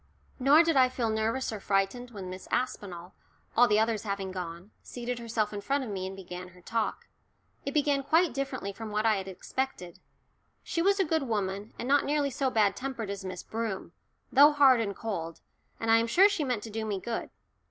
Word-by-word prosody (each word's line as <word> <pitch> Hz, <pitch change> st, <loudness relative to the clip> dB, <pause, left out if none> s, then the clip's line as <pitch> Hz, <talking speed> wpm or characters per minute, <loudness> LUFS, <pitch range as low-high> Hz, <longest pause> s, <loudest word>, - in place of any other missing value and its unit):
Nor 285 Hz, +5 st, +6 dB
did 330 Hz, -2 st, +1 dB
I 260 Hz, -1 st, +6 dB
feel 240 Hz, -3 st, -1 dB
nervous 225 Hz, +3 st, -1 dB
or 215 Hz, -, -5 dB
frightened 195 Hz, +6 st, 0 dB
when 200 Hz, -5 st, -8 dB
Miss 185 Hz, +1 st, -8 dB
Aspinall 190 Hz, -8 st, -3 dB, 0.4 s
all 245 Hz, +1 st, +6 dB
the 210 Hz, -, +3 dB
others 220 Hz, -1 st, +1 dB
having 200 Hz, -2 st, -3 dB
gone 180 Hz, +1 st, -7 dB
seated 245 Hz, 0 st, -5 dB
herself 225 Hz, -2 st, -1 dB
in 205 Hz, -, -4 dB
front 275 Hz, +5 st, 0 dB
of 230 Hz, -, -5 dB
me 190 Hz, -1 st, -3 dB
and 190 Hz, -, -7 dB
began 180 Hz, -1 st, -8 dB
her 180 Hz, 0 st, -17 dB
talk. 225 Hz, +4 st, -2 dB, 0.6 s
It 275 Hz, -, -3 dB
began 290 Hz, -1 st, +2 dB
quite 320 Hz, +2 st, +3 dB
differently 260 Hz, -7 st, -3 dB
from 225 Hz, +1 st, -7 dB
what 210 Hz, +1 st, -1 dB
I 220 Hz, -2 st, +4 dB
had 190 Hz, 0 st, -5 dB
expected. 190 Hz, -2 st, -4 dB, 0.6 s
She 335 Hz, -, -1 dB
was 395 Hz, +3 st, +3 dB
a 385 Hz, -, +3 dB
good 320 Hz, 0 st, +1 dB
woman, 200 Hz, -1 st, -2 dB
and 240 Hz, -, -4 dB
not 285 Hz, +1 st, +4 dB
nearly 290 Hz, -1 st, 0 dB
so 270 Hz, +1 st, 0 dB
bad 210 Hz, -5 st, +2 dB
tempered 250 Hz, -6 st, -4 dB
as 200 Hz, -1 st, -6 dB
Miss 185 Hz, -1 st, -6 dB
Broom, 220 Hz, -6 st, -4 dB, 0.4 s
though 290 Hz, +3 st, +7 dB
hard 270 Hz, -4 st, +6 dB
and 200 Hz, -3 st, -2 dB
cold, 165 Hz, -8 st, -4 dB, 0.4 s
and 225 Hz, 0 st, +1 dB
I 225 Hz, -, +7 dB
am 230 Hz, 0 st, +1 dB
sure 370 Hz, +12 st, +6 dB
she 405 Hz, -7 st, -1 dB
meant 250 Hz, -6 st, -1 dB
to 225 Hz, -, -7 dB
do 220 Hz, +1 st, -3 dB
me 205 Hz, -3 st, -2 dB
good. 230 Hz, +4 st, -4 dB
225 Hz, 210 wpm, -29 LUFS, 195-265 Hz, 0.6 s, though